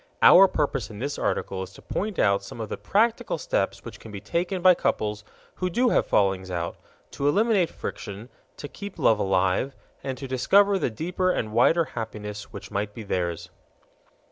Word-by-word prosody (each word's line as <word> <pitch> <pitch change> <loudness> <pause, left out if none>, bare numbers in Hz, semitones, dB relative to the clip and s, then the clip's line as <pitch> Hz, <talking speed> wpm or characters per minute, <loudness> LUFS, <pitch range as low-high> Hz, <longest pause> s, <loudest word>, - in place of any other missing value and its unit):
Our 195 +2 +9
purpose 135 - -1
in 105 - -9
this 140 +6 -4
article 95 -1 -2
is 95 - -7
to - - -14
point 205 0 -3
out 100 -1 +3
some 100 +4 -10
of 110 -2 -4
the - - -3
practical 225 +3 +1
steps - - -2
which - - -9
can 110 - -11
be 100 - -6
taken 175 - -2
by 185 -1 +8
couples 105 -9 -1 0.3
who 185 - -1
do 245 +7 +2
have - - +2
fallings 95 -2 +1
out, 85 -2 -3 0.4
to 140 - -2
eliminate 200 +1 +3
friction, 105 +4 -7 0.3
to 145 - -6
keep 200 +5 -9
love 110 -2 +3
alive, 95 +7 +1 0.3
and 130 -1 -4
to 135 - -6
discover 195 +10 +3
the 150 - 0
deeper 180 - -1
and 110 -11 -1
wider 160 +9 +4
happiness 105 -6 -7
which - - -9
might 105 +1 -3
be 115 - -7
theirs. 85 -4 -3
120 Hz, 185 wpm, -25 LUFS, -, 0.4 s, Our